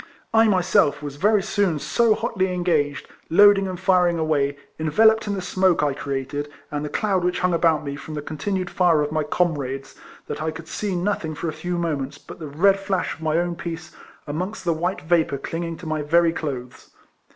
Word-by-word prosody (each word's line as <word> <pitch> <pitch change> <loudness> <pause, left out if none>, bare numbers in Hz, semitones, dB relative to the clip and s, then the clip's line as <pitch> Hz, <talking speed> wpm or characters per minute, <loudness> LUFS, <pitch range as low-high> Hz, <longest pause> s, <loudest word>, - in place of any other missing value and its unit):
I 225 0 +6
myself 185 -6 +2
was 145 -1 -6
very 205 +4 +3
soon 190 -6 +1
so 225 +8 +2
hotly 205 -5 -1
engaged, 160 -5 0 0.2
loading 200 +2 +6
and 185 -2 -5
firing 180 -2 +3
away, 145 -3 0 0.2
enveloped 220 +8 +4
in 205 - -1
the 190 - -4
smoke 185 -2 +2
I 145 -2 +1
created, 140 +1 -4 0.2
and 145 0 -2
the 150 - -3
cloud 195 -2 0
which 180 0 0
hung 180 -1 +2
about 165 -2 +2
me 140 0 -4
from 150 +2 -8
the 150 - -4
continued 185 +5 -3
fire 170 -5 +3
of 150 - -3
my 155 0 0
comrades, 145 -4 -1 0.3
that - - -5
I 160 - -1
could 160 +1 -8
see 200 0 -3
nothing 175 -4 -1
for 165 - -3
a - - -5
few 175 +3 -3
minutes 145 -5 -2
but - - -12
the 155 - -6
red 195 +7 +3
flash 195 -1 -1
of - - -14
my 160 0 +1
own 175 0 0
piece 165 -1 -7 0.3
amongst 185 +6 -4
the 170 - +2
white 175 +4 -2
vapour 160 -3 +1
clinging 165 +4 -4
to 180 - -11
my 155 -1 -2
very 165 +3 +3
clothes. 130 -6 -6
165 Hz, 200 wpm, -23 LUFS, 150-185 Hz, 0.3 s, I